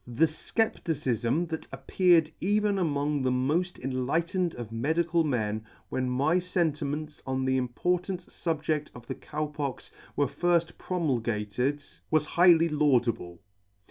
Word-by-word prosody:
The 125 +7 +3
fcepticifm 155 - -1
that 160 - -5
appeared 175 -4 +3
even 205 +1 +2
among 145 -3 0
the 130 - +1
mod 150 +8 0
enlightened 165 +8 -1
of 120 -2 -7
medical 160 +8 +1
men, 110 -7 -1 0.3
when 130 -1 -1
my 145 +8 +2
fentiments 155 -4 -2
on 130 0 -1
the 130 0 +2
important 180 +9 -1
fubje£t 155 -3 -2
of 120 -1 -11
the - - -4
Cow 155 0 -4
Pox 145 -3 -5 0.2
were 145 - +3
fird 170 +4 +1
promulgated, 125 - -1 0.3
was 155 -1 +3
highly 170 0 +5
laudable. 125 - +1
150 Hz, 125 wpm, -28 LUFS, 130-170 Hz, 0.3 s, highly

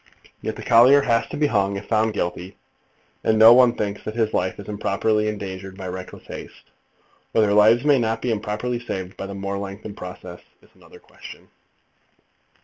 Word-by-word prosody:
And - - -23
yet - - -4
the - - -9
collier 125 +5 +6
has 115 -3 +1
to - - -7
be 150 - +2
hung, 100 -6 0
if 100 - -8
found 110 -1 +1
guilty, 90 0 -4 0.7
and 110 - +2
no 110 +2 +9
one 125 -1 +5
thinks 105 -1 -4
that 110 - -6
his 110 -2 0
life 95 +2 -1
is 100 - -10
improperly 105 +1 0
endangered 95 -2 -6
by 95 -2 -7
reckless 90 0 -9
haste. - - -11 0.6
Whether 105 -2 +3
lives 110 +5 +5
may 145 -3 +4
not 115 -1 -1
be 120 - -2
improperly 110 +3 -3
saved 95 -6 -6
by 95 - -6
the 100 - -7
more 100 0 -4
lengthened 100 +1 -8
process 90 -1 -9 0.2
is - - -23
another - - -18
question. - - -14
105 Hz, 185 wpm, -22 LUFS, 100-115 Hz, 0.7 s, no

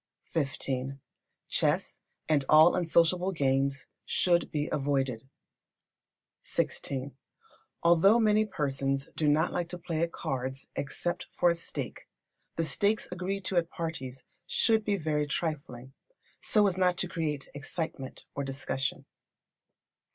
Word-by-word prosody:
xv. 135 -3 -2 0.5
Chess - - 0 0.3
and 150 -3 +3
all 155 +3 +8
unsociable 175 +2 +3
games 135 -3 +1 0.2
should 175 -1 +2
be 150 -1 -1
avoided. 135 -3 -1 1.1
xvi. 135 +1 -2 0.7
Although 175 +7 +6
many 215 -1 +4
persons 135 -5 -1
do 155 - +1
not 155 +3 +3
like 175 -1 -2
to 180 - -4
play 165 -2 -3
at 170 0 0
cards 130 0 -4
except 160 +5 -3
for 175 - +5
a - - 0
stake, 170 - -5 0.5
the 165 - 0
stakes 205 +6 +2
agreed 185 +2 -3
to 185 - 0
at 170 -1 +2
parties 135 -6 -5 0.2
should 220 +2 +3
be 205 -1 +1
very 150 -3 0
trifling, 135 -5 -4 0.5
so 210 -1 +4
as 190 -2 +1
not 180 -1 +3
to 185 - +1
create 155 -5 -3
excitement 145 -1 -5
or 140 - -3
discussion. 135 -1 -2
155 Hz, 125 wpm, -30 LUFS, 135-175 Hz, 1.1 s, all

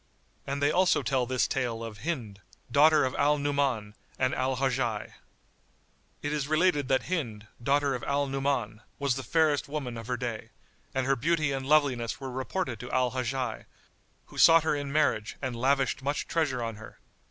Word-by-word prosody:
And 140 +1 -2
they 145 - +4
also 185 +2 +3
tell 130 -3 0
this 130 0 +1
tale 120 -4 -2
of 110 -2 -7
HIND, 115 -8 -4 0.3
DAUGHTER 155 +2 +5
OF 130 - -2
AL 150 +1 +2
NU'MAN 140 -7 0 0.2
AND 130 0 +1
AL 130 0 0
HAJJAJ.[FN#94] 125 -5 -1 1.1
It 145 +1 -1
is 145 -2 -1
related 155 -2 +2
that 135 -1 +2
Hind, 120 - -3 0.2
daughter 140 +2 +2
of 125 - -4
Al 140 0 +1
Nu'man, 135 -5 -2 0.2
was 140 -3 0
the 135 - -3
fairest 155 +2 +2
woman 135 -5 -4
of 115 - -9
her 125 - -1
day, 120 -3 -5 0.5
and 130 -1 +1
her 135 +1 +3
beauty 155 +3 +1
and 135 -1 -3
loveliness 135 -6 +2
were 135 -2 -6
reported 130 - -3
to 125 +2 -7
Al 125 -1 +1
Hajjaj, 130 -1 -3 0.6
who - - -10
sought 165 -1 +7
her 160 - +1
in 145 -1 -4
marriage 130 -8 +1
and 130 -3 -3
lavished 135 +3 +1
much 145 +2 -2
treasure 145 -7 0
on 115 -2 -4
her. 110 - -12
135 Hz, 180 wpm, -28 LUFS, 120-145 Hz, 1.1 s, sought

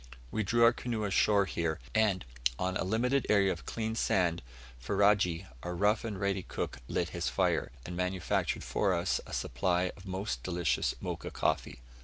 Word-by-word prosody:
We 110 - 0
drew 115 +4 +3
our 115 +1 +7
canoe 120 -3 -3
ashore 100 0 +3
here, 80 -3 -2
and, 105 -4 +2 0.3
on 95 0 -1
a - - 0
limited 120 +7 +1
area 100 -2 +4
of 85 - -6
clean 110 -1 -2
sand, 90 -6 +1 0.4
Ferajji, 95 +3 +2 0.2
our 90 0 -4
rough 105 +4 +2
and 105 -4 -4
ready 100 -1 0
cook, - - -4
lit - - -1
his - - -2
fire, - - +1
and 90 - -5
manufactured 90 -1 -1
for 95 -3 +1
us 85 +2 0
a - - -10
supply 90 +8 0
of 95 0 -13
most 95 -8 -3
delicious 85 -5 0
Mocha - - -4
coffee. - - -1
95 Hz, 170 wpm, -31 LUFS, 90-105 Hz, 0.4 s, our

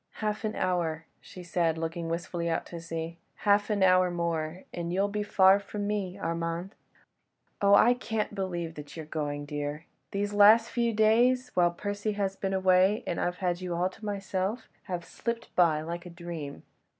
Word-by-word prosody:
"Half 215 0 -3
an 215 0 -2
hour," 165 -3 -1
she 180 - -11
said, 170 -2 0
looking 165 +1 -3
wistfully 170 0 -2
out 165 - -1
to 170 -1 -8
sea, 165 0 -5 0.3
"half 205 +1 +4
an 205 -2 +2
hour 185 -1 +5
more 170 0 -2
and 170 -1 -3
you'll 195 +3 +2
be 210 +1 -2
far 195 -1 +5
from 205 0 -5
me, 200 -3 -2
Armand! 170 +2 -3 0.9
Oh! 200 0 +6
I 240 +4 +6
can't 220 -4 -3
believe 175 -4 -3
that 150 +1 -10
you 160 - -5
are - - -12
going, 145 -1 -3
dear! 145 +2 -4 0.2
These 205 +1 -2
last 215 +3 +6
few 235 0 +1
days—whilst 220 -4 +3
Percy 205 +1 -2
has 195 -1 -1
been 195 0 -3
away, 190 +2 +4
and 170 - -2
I've 175 0 -1
had 180 -1 -1
you 180 -2 -3
all 180 +2 +1
to 190 - -17
myself, 200 +1 -2 0.2
have 180 -4 -4
slipped 235 0 -5
by 165 -4 +4
like 170 +2 -5
a - - -8
dream." 170 -4 -7
185 Hz, 180 wpm, -29 LUFS, 170-205 Hz, 0.9 s, Oh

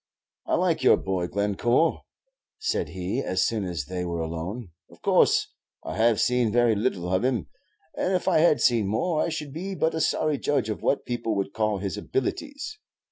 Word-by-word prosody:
"I - - +2
like - - +1
your - - +6
boy, 95 -2 -2
Glencore," 105 - +1 0.6
said 435 - -1
he, 90 +3 -3
as 95 0 0
soon 110 -4 -1
as 85 -6 -3
they 90 +3 -4
were 85 -1 -3
alone. 85 +6 -5 0.2
"Of - - -19
course - - +3 0.3
I - - -5
have 115 -1 +3
seen 125 -3 +2
very 120 0 +4
little 100 -5 -1
of 95 - +2
him; 125 -2 0 0.5
and 185 - 0
if 180 - -2
I - - +4
had 155 -2 +4
seen 115 -5 +3
more 155 - 0
I - - 0
should 150 -4 -5
be 190 +5 -4
but 160 -2 +1
a 160 - -1
sorry 155 -3 +1
judge 135 -6 0
of 105 - -3
what 140 - 0
people 120 -3 -2
would 100 0 -2
call 110 -2 0
his 100 +1 -4
abilities. 285 - -3
110 Hz, 190 wpm, -26 LUFS, 95-145 Hz, 0.6 s, your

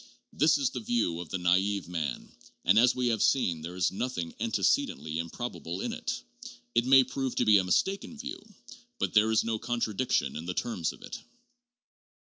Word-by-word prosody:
This 155 +1 +4
is 140 -3 0
the 125 - -4
view 110 -8 0
of 85 -3 -7
the - - -2
naive 95 +2 +1
man, 80 -7 -4 0.3
and, 100 +4 +5
as 125 +1 +5
we 125 -1 +1
have 110 -2 0
seen, 90 -12 +2
there 85 +3 -7
is 90 -2 +1
nothing 95 -6 -3
antecedently 115 - 0
improbable 85 -1 -5
in - - -3
it. - - -4 0.5
It 120 +1 +2
may 135 0 +8
prove 130 0 -3
to 125 - +1
be 105 -2 +6
a - - 0
mistaken 195 - 0
view, - - -6 0.6
but 230 - -1
there 110 0 +5
is 110 - +3
no 115 -1 -2
contradiction 110 - -1
in 80 +3 -6
the 90 - -3
terms 95 -9 -1
of - - -15
it. - - -7
105 Hz, 185 wpm, -29 LUFS, 90-125 Hz, 0.6 s, may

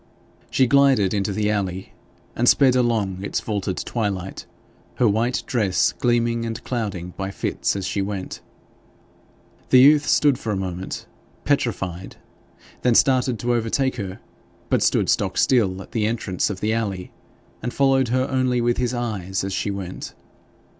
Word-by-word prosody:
She 130 - +3
glided 135 -7 +4
into 100 -1 0
the 105 +1 0
alley 95 -3 -3 0.4
and 120 +1 +3
sped 130 -3 +5
along 110 -7 +1
its - - -1
vaulted 100 -3 -3
twilight, 100 -5 -3 0.5
her 120 - +3
white 115 +4 0
dress 105 -7 +1
gleaming 120 -2 +1
and 115 +1 -5
clouding 100 -8 -4
by 95 0 -3
fits 100 - -2
as 100 -2 -3
she 100 - -1
went. 95 -1 -5 1.3
The 130 - +6
youth 145 +3 +6
stood 145 -4 +3
for 110 - -3
a 100 - -1
moment 95 0 -5 0.4
petrified, 95 - -1 0.7
then 125 -2 +3
started 130 -2 +3
to 120 0 +1
overtake 120 +3 0
her, 95 -3 -5 0.5
but - - +3
stood - - +2
stock - - 0
still 95 -7 +2
at - - -18
the 110 -3 0
entrance 110 -5 -1
of 100 -2 -5
the 110 +1 +1
alley, 100 -5 -3 0.5
and 120 - -3
followed 135 -1 +2
her 130 +3 +1
only 130 -2 +1
with 120 0 +1
his 125 0 -1
eyes 100 -6 -3
as 95 0 -3
she 100 - -1
went. 95 -2 -6
110 Hz, 155 wpm, -22 LUFS, 95-125 Hz, 1.3 s, The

